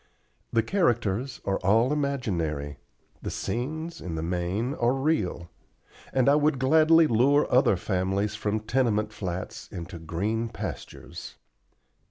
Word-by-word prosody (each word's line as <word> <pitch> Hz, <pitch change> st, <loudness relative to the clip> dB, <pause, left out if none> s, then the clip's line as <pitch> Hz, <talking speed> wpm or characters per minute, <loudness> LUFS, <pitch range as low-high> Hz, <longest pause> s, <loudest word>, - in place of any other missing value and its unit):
The 115 Hz, -, +2 dB
characters 120 Hz, -, 0 dB
are 95 Hz, -, 0 dB
all 115 Hz, +8 st, +3 dB
imaginary; 85 Hz, -, -2 dB, 0.4 s
the -, -, -4 dB
scenes, 155 Hz, +7 st, -4 dB
in 85 Hz, -3 st, -5 dB
the 80 Hz, -, -3 dB
main, 90 Hz, +9 st, -1 dB
are 120 Hz, -2 st, +1 dB
real: 135 Hz, -, -1 dB, 0.6 s
and 130 Hz, -1 st, +2 dB
I 140 Hz, -, +6 dB
would 150 Hz, -1 st, +3 dB
gladly 160 Hz, +5 st, +5 dB
lure 140 Hz, +4 st, +4 dB
other 125 Hz, -6 st, +4 dB
families 95 Hz, +3 st, -1 dB
from 105 Hz, 0 st, -2 dB
tenement 110 Hz, -2 st, 0 dB
flats 95 Hz, -4 st, -5 dB
into 85 Hz, -1 st, -7 dB
green 105 Hz, +8 st, -2 dB
pastures. 115 Hz, -, -7 dB
110 Hz, 125 wpm, -27 LUFS, 95-135 Hz, 0.6 s, I